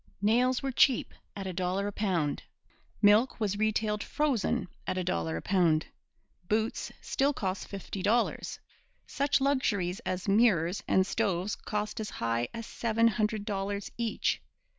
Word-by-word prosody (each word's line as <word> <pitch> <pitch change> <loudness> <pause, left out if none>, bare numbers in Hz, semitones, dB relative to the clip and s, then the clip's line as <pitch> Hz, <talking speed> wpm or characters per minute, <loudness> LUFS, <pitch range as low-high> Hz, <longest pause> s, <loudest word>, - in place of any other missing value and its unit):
Nails 245 +5 +3
were 270 - -1
cheap 255 0 +3 0.2
at 195 -1 -5
a 185 - -3
dollar 185 +2 -1
a 205 - -2
pound. 180 -8 0 0.6
Milk 210 +6 +5
was 205 -2 -1
retailed 215 -1 +1
frozen 280 -11 0 0.2
at 185 - -1
a 185 - 0
dollar 80 - -1
a - - -6
pound. 175 -5 +3 0.6
Boots 220 +1 0
still 280 +2 +1
cost 190 -6 -3
fifty 195 0 -6
dollars. 220 +5 +1 0.5
Such 280 0 +1
luxuries 215 -9 +1
as 185 -4 -4
mirrors 195 -4 +3
and 190 - +4
stoves 195 -2 0
cost 210 +1 -3
as 215 - -3
high 115 +1 -1
as 230 -1 -6
seven 230 0 +2
hundred 215 0 -1
dollars 200 -1 -3
each. 230 -2 -1
205 Hz, 145 wpm, -30 LUFS, 185-230 Hz, 0.6 s, Milk